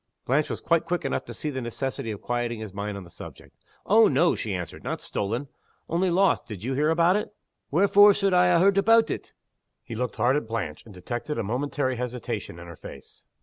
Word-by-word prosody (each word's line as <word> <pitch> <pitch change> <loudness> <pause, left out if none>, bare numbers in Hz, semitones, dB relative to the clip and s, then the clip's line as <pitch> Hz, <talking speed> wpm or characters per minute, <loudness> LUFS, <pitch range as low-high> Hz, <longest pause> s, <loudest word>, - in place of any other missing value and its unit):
Blanche 140 +4 +1
was - - -3
quite 170 -1 +2
quick 175 +1 -2
enough - - -2
to - - -9
see 150 - -3
the 130 -1 -4
necessity 120 0 -4
of 105 -2 -6
quieting 120 -1 -2
his 110 -3 -7
mind 100 0 -4
on 100 - -8
this 85 -1 -16
point. - - -11 0.3
"Oh 220 +3 +6
no!" 175 0 +3
she 105 -3 -3
answered. 90 -3 -6
"Not - - -3
stolen. 115 +8 -3 0.4
Only 180 +3 +1
lost. 190 +3 +2
Did 105 -4 -8
you 130 +3 -2
hear 150 +3 +1
about 170 +4 +4
it?" 210 - -3 0.4
"Wherefore 200 +5 +6
suld 195 -2 +1
I 180 0 +5
ha' 170 - +4
heard 195 +2 +4
aboot 225 +3 +4
it?" - - -6 0.5
He - - -8
looked 125 +2 -3
hard 130 +3 +2
at 150 - -4
Blanche 105 -9 -4
and 110 - -13
detected 120 - -4
a 115 - -1
momentary 130 +3 -1
hesitation 125 -7 -5
in 85 - -10
her 85 -1 -10
face. - - -13
130 Hz, 220 wpm, -26 LUFS, 110-175 Hz, 0.5 s, Oh